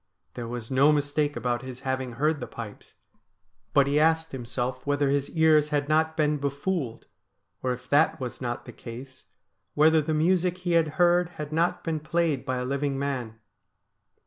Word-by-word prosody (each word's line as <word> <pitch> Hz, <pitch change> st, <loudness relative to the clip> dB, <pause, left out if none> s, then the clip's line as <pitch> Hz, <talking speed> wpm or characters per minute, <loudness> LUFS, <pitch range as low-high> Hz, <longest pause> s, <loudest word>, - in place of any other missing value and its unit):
There 120 Hz, -2 st, -6 dB
was 120 Hz, 0 st, -6 dB
no 135 Hz, +3 st, +5 dB
mistake 145 Hz, 0 st, 0 dB
about 120 Hz, 0 st, -1 dB
his 130 Hz, -1 st, -8 dB
having 130 Hz, -2 st, -2 dB
heard 150 Hz, +5 st, +1 dB
the -, -, -5 dB
pipes, 110 Hz, -3 st, -9 dB, 0.8 s
but 140 Hz, -, +5 dB
he 140 Hz, +2 st, +2 dB
asked 160 Hz, +1 st, +2 dB
himself 125 Hz, 0 st, -4 dB
whether 145 Hz, -1 st, +1 dB
his 140 Hz, 0 st, 0 dB
ears 155 Hz, -2 st, +5 dB
had 145 Hz, -1 st, 0 dB
not 160 Hz, +1 st, +1 dB
been 150 Hz, -1 st, +2 dB
befooled; 140 Hz, -2 st, -2 dB, 0.6 s
or, 130 Hz, -, 0 dB
if 125 Hz, 0 st, -6 dB
that 150 Hz, +3 st, +3 dB
was 125 Hz, -1 st, -6 dB
not 120 Hz, -1 st, -3 dB
the -, -, -10 dB
case, 130 Hz, +2 st, -10 dB, 0.5 s
whether 155 Hz, +1 st, +5 dB
the 155 Hz, +1 st, -1 dB
music 180 Hz, +3 st, +2 dB
he 180 Hz, -1 st, -3 dB
had 165 Hz, -2 st, +4 dB
heard 175 Hz, -1 st, +4 dB
had 150 Hz, 0 st, -5 dB
not 175 Hz, +2 st, +1 dB
been 160 Hz, -2 st, -1 dB
played 155 Hz, -3 st, -1 dB
by 130 Hz, 0 st, 0 dB
a 125 Hz, -, -2 dB
living 140 Hz, +1 st, -1 dB
man. 130 Hz, -5 st, -3 dB
145 Hz, 175 wpm, -27 LUFS, 130-160 Hz, 0.8 s, no